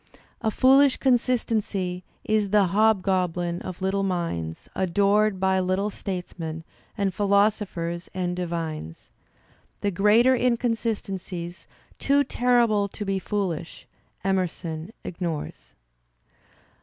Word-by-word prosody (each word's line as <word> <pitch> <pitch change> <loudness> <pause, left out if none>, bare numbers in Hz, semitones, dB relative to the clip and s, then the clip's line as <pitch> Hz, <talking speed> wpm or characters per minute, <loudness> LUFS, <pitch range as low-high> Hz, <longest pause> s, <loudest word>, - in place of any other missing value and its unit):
"A 220 - +1
foolish 270 +4 +5
consistency 220 -8 0 0.2
is 215 -2 +1
the 205 0 +5
hobgoblin 185 -5 +1
of 185 +1 -7
little 195 +1 +1
minds, 170 - -3
adored 200 +2 +2
by 190 0 +2
little 185 +3 0
statesmen, 175 -5 -5 0.3
and 200 -2 0
philosophers 200 -4 +1
and 180 -1 -2
divines.*' 165 - -5 0.7
The 205 - 0
greater 210 +7 +5
inconsistencies, 205 -8 -2 0.3
too 285 +1 +3
terrible 240 -5 +2
to 205 +1 -7
be 195 -1 0
foolisl]^ 185 -5 -3 0.4
Emerson 180 -2 -2
ignores. 165 - -5
195 Hz, 95 wpm, -25 LUFS, 175-215 Hz, 0.7 s, foolish